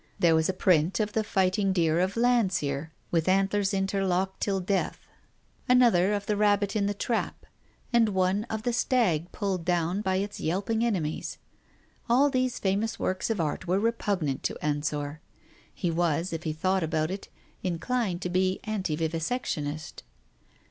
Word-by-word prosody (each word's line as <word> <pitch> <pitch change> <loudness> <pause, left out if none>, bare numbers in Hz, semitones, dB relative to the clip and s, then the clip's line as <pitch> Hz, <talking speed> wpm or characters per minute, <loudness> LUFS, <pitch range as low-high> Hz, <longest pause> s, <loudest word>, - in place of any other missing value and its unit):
There 170 -2 +4
was 160 +1 +2
a - - +1
print 180 -1 +2
of 210 -1 -1
the 220 - +1
fighting 195 0 +1
deer 165 -2 +2
of 190 +4 0
Landseer 185 - +1 0.2
with 165 -1 +1
antlers 195 +1 +2
interlocked 195 -1 0
till 195 -2 0
death, 190 +1 -1 0.7
another 230 -7 +5
of 205 -1 -2
the 210 - 0
rabbit 205 0 +2
in 200 -2 +1
the 205 - -1
trap, 230 +3 -2 0.5
and 230 -2 +5
one 190 +2 +1
of 220 -2 -4
the 245 - 0
stag 210 - +1
pulled 195 -4 -2
down 175 +2 0
by 190 -2 0
its 200 +2 -2
yelping 200 +7 0
enemies. 180 -10 -2 0.7
All 275 +4 +4
these 255 -2 0
famous 210 +4 0
works 185 0 -1
of 225 -4 -1
art 160 +3 -2
were 180 +2 +2
repugnant 200 - -1
to - - -1
Ensor. 150 0 -2 0.5
He 175 -3 -2
was, 170 +1 0
if 165 +2 -5
he 155 - 0
thought 185 +4 0
about 160 0 0
it, 195 +1 -6 0.3
inclined 185 +1 -1
to 180 - -2
be 185 +1 +1
anti 190 -8 -2
vivisectionist. 160 -2 -3
190 Hz, 160 wpm, -27 LUFS, 165-210 Hz, 0.7 s, another